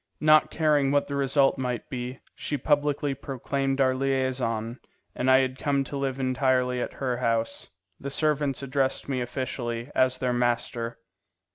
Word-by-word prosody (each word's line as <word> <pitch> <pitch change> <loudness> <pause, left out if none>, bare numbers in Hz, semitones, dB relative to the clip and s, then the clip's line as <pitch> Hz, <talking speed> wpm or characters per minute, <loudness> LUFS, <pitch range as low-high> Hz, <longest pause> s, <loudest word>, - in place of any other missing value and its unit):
Not 155 0 +5
caring 150 -3 +2
what 145 0 +2
the 140 - -6
result 135 0 +2
might 125 -3 -3
be, 125 0 -5
she 145 - -3
publicly 145 0 +1
proclaimed 135 0 -2
our 130 -1 +4
liaison, 130 -3 -1 0.3
and 130 - 0
I 130 0 +7
had 130 0 -2
come 140 -1 +1
to 140 - -7
live 135 -1 -2
entirely 130 -1 +1
at - - -4
her 125 -3 -2
house. 115 -4 -1 0.3
The 140 - -5
servants 145 -2 0
addressed 135 0 0
me 130 -2 -1
officially 120 0 -4
as 130 0 +2
their 125 -1 0
master. 120 -1 -1
130 Hz, 155 wpm, -26 LUFS, 125-140 Hz, 0.3 s, I